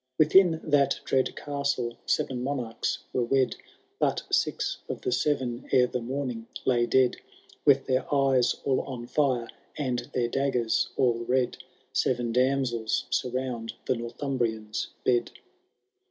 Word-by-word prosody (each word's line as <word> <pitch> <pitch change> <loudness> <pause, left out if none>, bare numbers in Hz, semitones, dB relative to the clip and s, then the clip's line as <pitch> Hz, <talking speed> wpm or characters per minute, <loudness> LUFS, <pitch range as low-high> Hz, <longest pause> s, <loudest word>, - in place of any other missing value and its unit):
Within 160 +1 +5
that 145 -3 +2
dread 130 -1 +1
castle 140 -4 -2
sev^ 130 - +1
monarchs 125 -2 -2 0.2
were 125 - +1
wed. 130 +2 +2 0.4
But - - +1
six - - 0
of - - -4
the 385 - -1
seven 130 - -1
ere 125 -1 +6
the 125 0 -3
morning 125 -2 -4 0.2
lay 120 -2 +3
dead; 130 -1 +3 0.5
With 140 -2 +5
their 130 0 0
eyes 135 -3 +3
all 135 -2 +2
on 125 -3 -6
fire, 125 -3 +1 0.3
and 130 -4 -1 0.2
their 120 -2 +2
daggers 125 -3 +1
all 120 -2 +3
red, 125 0 +1 0.4
Seven 120 -2 +1
damsels 125 -3 +1
surround 125 -3 -2
the - - +2
Northumhrian*s 120 -3 -2 0.2
bed. 120 -2 +2
130 Hz, 130 wpm, -27 LUFS, 120-135 Hz, 0.5 s, ere